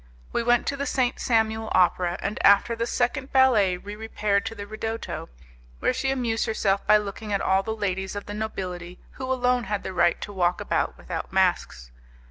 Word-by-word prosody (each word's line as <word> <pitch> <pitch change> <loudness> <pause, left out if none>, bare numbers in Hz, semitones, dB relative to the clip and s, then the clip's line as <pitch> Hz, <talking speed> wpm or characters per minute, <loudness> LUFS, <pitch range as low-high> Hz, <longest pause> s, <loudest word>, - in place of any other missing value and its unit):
We - - +1
went 240 0 +3
to 280 - -1
the 280 0 -3
Saint 255 -1 0
Samuel 220 -2 +1
opera, 180 -1 +2
and 205 +1 -3
after 200 +4 +5
the 230 +1 -2
second 260 +3 -1
ballet 230 -9 +4
we 205 +3 -8
repaired 210 -1 -1
to 225 - -5
the 205 -1 -6
'ridotto', 220 - -5 0.5
where - - +1
she 260 +1 -1
amused 240 -4 0
herself 200 -3 +1
by 215 - +7
looking 210 +1 -5
at 200 - +1
all 190 0 +2
the 220 +3 -4
ladies 190 -2 -2
of 205 - -5
the 205 - -6
nobility 185 -4 -5
who 260 0 -5
alone 250 -1 +1
had 205 0 -2
the 190 - -5
right 175 -1 +3
to 205 - -6
walk 180 -2 +1
about - - -1
without - - -6
masks. 60 0 0
215 Hz, 195 wpm, -25 LUFS, 195-240 Hz, 0.5 s, by